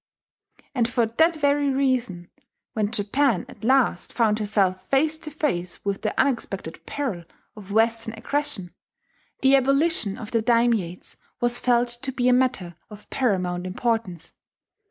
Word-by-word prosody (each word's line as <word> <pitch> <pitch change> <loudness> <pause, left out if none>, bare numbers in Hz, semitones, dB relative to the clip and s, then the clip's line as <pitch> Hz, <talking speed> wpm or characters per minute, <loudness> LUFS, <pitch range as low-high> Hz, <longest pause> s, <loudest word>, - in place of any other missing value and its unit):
And 240 -4 +1
for 240 -1 +2
that 320 +10 +2
very 285 -1 +2
reason, 255 -10 -1 0.4
when 210 -2 0
Japan 230 +1 +1
at - - -15
last 255 -7 +2
found 220 -3 +2
herself 200 -3 0
face 310 +3 +2
to 310 - -6
face 195 - -2
with 200 -1 -2
the 215 - -2
unexpected 200 -10 -1
peril 245 -12 -3 0.3
of 205 -2 -11
Western 225 +1 +1
aggression, 260 -6 -3 0.7
the 270 +1 +5
abolition 275 -5 +2
of 215 - -8
the 230 - +2
dairmates 225 -6 0 0.2
was 240 0 0
felt 245 -1 +2
to 240 +3 -5
be 250 -1 0
a 250 - +5
matter 245 -9 0
of 210 -1 -13
paramount 185 -7 0
importance. 185 -5 -2
230 Hz, 140 wpm, -24 LUFS, 200-265 Hz, 0.7 s, the